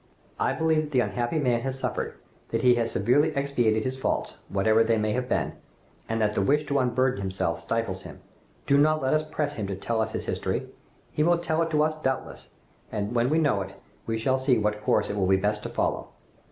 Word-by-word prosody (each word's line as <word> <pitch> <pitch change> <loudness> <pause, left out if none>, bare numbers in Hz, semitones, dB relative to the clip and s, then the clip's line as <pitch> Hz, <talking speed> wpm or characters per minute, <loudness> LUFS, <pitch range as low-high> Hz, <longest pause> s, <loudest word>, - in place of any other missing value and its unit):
I - - +1
believe 160 -1 +2
that 150 - -10
the 130 - +4
unhappy 120 +7 -1
man 125 -5 +1
has 135 +1 -3
suffered, - - -3 0.3
that 115 +1 -1
he 125 -1 +7
has 115 -1 0
severely 145 +10 +2
expiated 120 -6 +1
his 130 0 -3
faults, - - -1 0.2
whatever 110 +3 +3
they 115 0 +2
may 105 0 0
have 125 +2 -2
been, - - 0 0.6
and 115 0 0
that 105 -1 +1
the - - +1
wish 150 +9 +2
to 140 -1 +1
unburden 125 -3 +1
himself 95 -3 -2
stifles 115 -5 -2
him. - - -11 0.5
Do 140 0 +4
not 155 0 +3
let 130 - +2
us 155 0 +2
press 145 -1 -2
him 105 -7 -4
to 95 - -3
tell 110 +4 -1
us 110 0 -2
his - - -3
history! - - -2 0.4
He - - -1
will 170 +2 +4
tell 165 -1 0
it 165 - 0
to 150 -1 +3
us 155 0 +1
doubtless, 130 -2 -3 0.4
and 105 +1 -2
when 120 +1 +2
we 155 - +2
know 145 -11 +2
it, 95 +1 -7 0.3
we 115 0 0
shall 130 +4 +1
see 130 -2 +3
what 105 0 -1
course 105 0 +2
it 100 - -3
will 95 -2 +1
be 95 0 +4
best 105 +2 0
to - - -5
follow. - - -1
120 Hz, 230 wpm, -26 LUFS, 105-140 Hz, 0.6 s, he